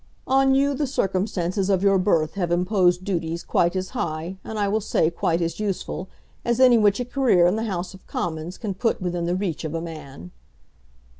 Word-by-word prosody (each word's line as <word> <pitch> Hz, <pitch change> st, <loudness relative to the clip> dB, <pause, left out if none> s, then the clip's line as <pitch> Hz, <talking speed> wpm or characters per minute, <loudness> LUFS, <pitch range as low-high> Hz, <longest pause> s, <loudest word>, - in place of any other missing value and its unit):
On 270 Hz, 0 st, +3 dB
you 280 Hz, +1 st, +3 dB
the 285 Hz, +1 st, -1 dB
circumstances 190 Hz, -4 st, -1 dB
of 190 Hz, -1 st, +2 dB
your 195 Hz, -1 st, +4 dB
birth 165 Hz, -5 st, +1 dB
have 175 Hz, -4 st, -2 dB
imposed 180 Hz, 0 st, +2 dB
duties 170 Hz, -3 st, -2 dB
quite 170 Hz, +2 st, +1 dB
as 185 Hz, 0 st, -2 dB
high, 170 Hz, -5 st, -4 dB
and 220 Hz, -, -6 dB
I 205 Hz, -1 st, +1 dB
will 215 Hz, +2 st, 0 dB
say 165 Hz, -5 st, +1 dB
quite 170 Hz, 0 st, 0 dB
as 165 Hz, +4 st, -3 dB
useful, 195 Hz, -2 st, -3 dB, 0.3 s
as 235 Hz, +1 st, 0 dB
any 250 Hz, -3 st, +6 dB
which 205 Hz, 0 st, +3 dB
a 245 Hz, -, -1 dB
career 245 Hz, -9 st, +3 dB
in 180 Hz, +3 st, +3 dB
the 225 Hz, +1 st, -2 dB
House 190 Hz, -3 st, -3 dB
of 190 Hz, -, -16 dB
Commons 165 Hz, +1 st, -4 dB
can 210 Hz, -4 st, -4 dB
put 225 Hz, +5 st, 0 dB
within 175 Hz, -2 st, -2 dB
the 175 Hz, -, 0 dB
reach 185 Hz, -5 st, -3 dB
of 160 Hz, 0 st, -4 dB
a -, -, -1 dB
man." 140 Hz, -, -9 dB
185 Hz, 205 wpm, -24 LUFS, 170-215 Hz, 0.3 s, any